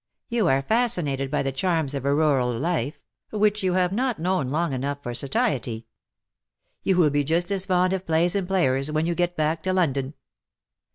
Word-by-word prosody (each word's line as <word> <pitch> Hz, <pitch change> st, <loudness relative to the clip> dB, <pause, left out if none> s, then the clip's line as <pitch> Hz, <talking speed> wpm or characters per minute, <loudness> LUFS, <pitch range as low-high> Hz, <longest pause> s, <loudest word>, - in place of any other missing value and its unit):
You 235 Hz, -6 st, +1 dB
are 135 Hz, -2 st, +2 dB
fasci 230 Hz, -, +2 dB
nated 135 Hz, -2 st, -2 dB
by 150 Hz, -, 0 dB
the 135 Hz, -, -1 dB
charms 160 Hz, 0 st, 0 dB
of 140 Hz, -1 st, -4 dB
a 140 Hz, 0 st, +2 dB
rural 140 Hz, -5 st, +2 dB
life, 145 Hz, +2 st, -2 dB, 0.3 s
which 210 Hz, 0 st, +1 dB
you 185 Hz, -2 st, +1 dB
have 180 Hz, -1 st, +2 dB
not 250 Hz, +1 st, 0 dB
known 175 Hz, -5 st, 0 dB
long 160 Hz, +1 st, 0 dB
enough 140 Hz, +2 st, -2 dB
for 120 Hz, -, -4 dB
satiety. 120 Hz, -3 st, -1 dB, 1.0 s
You 190 Hz, -, +1 dB
will 160 Hz, -5 st, +4 dB
be 145 Hz, 0 st, +1 dB
just 170 Hz, +5 st, 0 dB
as 195 Hz, -1 st, -1 dB
fond 185 Hz, 0 st, +2 dB
of 190 Hz, 0 st, -4 dB
plays 165 Hz, +2 st, +2 dB
and 195 Hz, -3 st, -1 dB
players 135 Hz, -7 st, +1 dB
when 155 Hz, +1 st, 0 dB
you 170 Hz, -, 0 dB
get 175 Hz, 0 st, -1 dB
back 155 Hz, +1 st, 0 dB
to 185 Hz, +3 st, -1 dB
London." 140 Hz, -6 st, 0 dB
160 Hz, 195 wpm, -24 LUFS, 135-185 Hz, 1.0 s, will